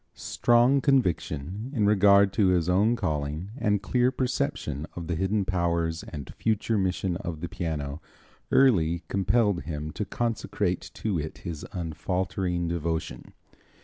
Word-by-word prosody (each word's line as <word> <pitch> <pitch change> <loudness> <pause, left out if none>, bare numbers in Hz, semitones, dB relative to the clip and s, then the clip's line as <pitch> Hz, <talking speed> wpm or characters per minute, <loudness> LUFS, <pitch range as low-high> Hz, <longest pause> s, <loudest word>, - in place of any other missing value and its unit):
Strong 120 +3 +3
conviction 100 - 0
in 105 -4 +2
regard 100 -1 +5
to 100 - +3
his 90 -2 +2
own 100 +6 +3
calling 80 -2 -3
and 105 -6 0
clear 125 +3 +2
perception 125 - -2
of 85 - -5
the 85 - -2
hidden 95 +4 0
powers 85 -3 0
and 70 -5 -8
future 110 0 0
mission 95 -2 0
of 85 -3 -5
the 85 - -4
piano 80 -4 -4 0.5
early 85 -11 +4
compelled 100 0 +2
him 75 -1 -5
to 105 - -3
consecrate 105 -4 -2
to 100 -6 -1
it 80 +1 -5
his 85 -4 -5
unfaltering 90 +1 -2
devotion. 80 -6 -3
90 Hz, 135 wpm, -27 LUFS, 80-105 Hz, 0.5 s, regard